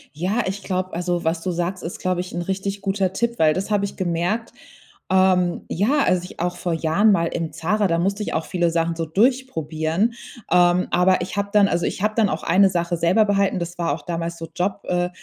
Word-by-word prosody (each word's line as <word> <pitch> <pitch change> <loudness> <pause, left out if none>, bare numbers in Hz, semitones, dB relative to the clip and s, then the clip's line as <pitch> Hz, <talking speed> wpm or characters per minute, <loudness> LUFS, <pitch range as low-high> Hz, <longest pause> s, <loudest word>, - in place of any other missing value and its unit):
Ja, 190 +9 0
ich 195 +1 -4
glaub 185 0 -2
also 175 0 -1
was 165 +1 0
du 185 - -2
sagst, 175 +2 -3
ist, 170 - -6
glaube 185 -1 0
ich 180 - -8
'n 175 - -2
richtig 195 +2 -3
guter 195 -1 0
Tipp, 235 +3 -1
weil 155 -1 +4
das 190 +5 -3
habe 205 -1 +1
ich 200 - -7
gemerkt, 185 +5 -1 0.6
ähm. 185 -2 +3
Ja, 225 - +1
also 180 -1 +2
ich 180 - -11
auch 175 +1 -1
vor 175 - -2
Jahren 165 +7 +3
mal 170 -4 +2
im 165 -2 -3
ZARA 185 +6 0
da 170 -2 +1
musste 200 +4 0
ich - - -4
auch 160 - -1
viele 175 -2 0
Sachen 165 0 0
so 165 0 -2
durchprobieren. 190 - 0 0.4
Ähm, 175 0 +4
aber 185 +1 +3
ich 180 +3 -5
habe 200 0 -1
dann 205 -1 +5
also 170 -2 0
ich - - -4
habe 215 0 +1
dann 220 -3 +3
auch - - -3
eine 195 +1 +4
Sache 175 -1 -1
selber 175 +6 +3
behalten, 200 -2 +1
das 175 0 -5
war 170 -1 0
auch - - -6
damals 170 -1 -4
so 165 - -7
job 190 +3 -1
äh 180 0 0
180 Hz, 230 wpm, -22 LUFS, 170-200 Hz, 0.6 s, dann